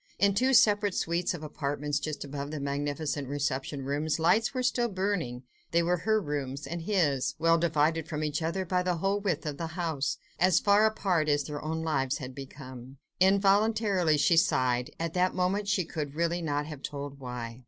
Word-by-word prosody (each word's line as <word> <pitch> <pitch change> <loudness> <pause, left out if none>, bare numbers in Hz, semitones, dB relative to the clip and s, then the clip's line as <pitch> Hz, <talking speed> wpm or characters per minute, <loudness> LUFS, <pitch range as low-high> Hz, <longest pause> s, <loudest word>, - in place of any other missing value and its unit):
In 200 0 +3
two 255 +6 +3
separate 205 -3 +4
suites 170 +2 0
of 155 - -8
apartments, 145 -1 -2
just 150 0 -4
above 140 0 -5
the 155 0 -4
magnificent 145 +1 -2
reception 140 0 -2
rooms, 145 +3 -1
lights 195 +7 +3
were 255 -2 -2
still 245 -1 +1
burning; 185 - -2 0.3
they 170 0 +2
were 175 +1 +1
her 220 +5 +1
rooms, 145 -5 -4
and 170 0 -5
his, 165 -8 +1
well 165 +1 +3
divided 160 -1 +1
from 155 -1 -3
each 150 +1 -1
other 170 +4 -1
by 180 +1 +1
the 180 -1 0
whole 195 +4 0
width 200 -4 -2
of 150 -2 -3
the 165 - -3
house, 160 -6 -1 0.2
as 180 0 +4
far 205 +1 +5
apart 180 -8 0
as 145 -1 +2
their 145 0 -6
own 160 +1 -2
lives 140 -4 0
had 130 -2 -7
become. 130 -1 -10 0.2
Involuntarily 195 -2 +3
she 165 +3 +3
sighed—at 130 +3 +1
that 185 0 +1
moment 190 +3 0
she 190 -2 +1
could 150 -3 -5
really 170 +2 0
not 145 -2 -1
have 150 -3 -8
told 140 -1 -6
why. 125 -2 -6
160 Hz, 185 wpm, -29 LUFS, 145-185 Hz, 0.3 s, far